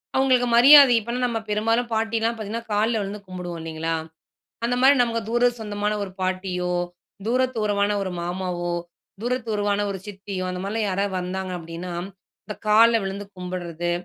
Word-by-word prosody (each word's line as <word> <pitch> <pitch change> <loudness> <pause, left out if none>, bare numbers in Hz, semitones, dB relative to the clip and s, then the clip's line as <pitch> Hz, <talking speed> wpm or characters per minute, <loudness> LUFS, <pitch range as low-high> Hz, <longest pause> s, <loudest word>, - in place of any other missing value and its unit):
அவங்களுக்கு 260 -2 +3
மரியாதை, 275 +1 +9
இப்பனா 235 +3 -4
நம்ம 235 -2 -1
பெரும்பாலும் 225 +3 +1
பாட்டிலாம் 225 +1 0
பாத்திங்கன்னா 225 +2 -5
கால்ல 220 +2 +2
விழுந்து 200 +1 -5
கும்பிடுவோம் 180 -2 -6
இல்லைங்களா. 160 0 -3 0.7
அந்த 245 - +1
மாரி 275 +2 +7
நமக்கு 230 -1 0
தூர 240 +1 +3
சொந்தமான 210 -1 -2
ஒரு 190 - -7
பாட்டியோ, 185 -1 -1 0.5
தூர 250 +2 +2 0.2
தூரமான 205 -1 +1
ஒரு 185 - -3
மாமாவோ, 175 -1 -3 0.5
தூர 245 +2 0
தூரவான 205 -1 0
ஒரு 190 - -5
சித்தியோ, 195 -2 -5
அந்தமாதிரிலாம் 200 +4 -2
யாராவது 195 0 -1
வந்தாங்க 185 +1 -4
அப்படினா, 170 +1 -7 0.5
இந்த 210 - -6
கால்ல 225 +2 +6
விழுந்து 200 +1 -5
கும்பிடுறது, 175 -2 -4
205 Hz, 145 wpm, -24 LUFS, 185-230 Hz, 0.7 s, மரியாதை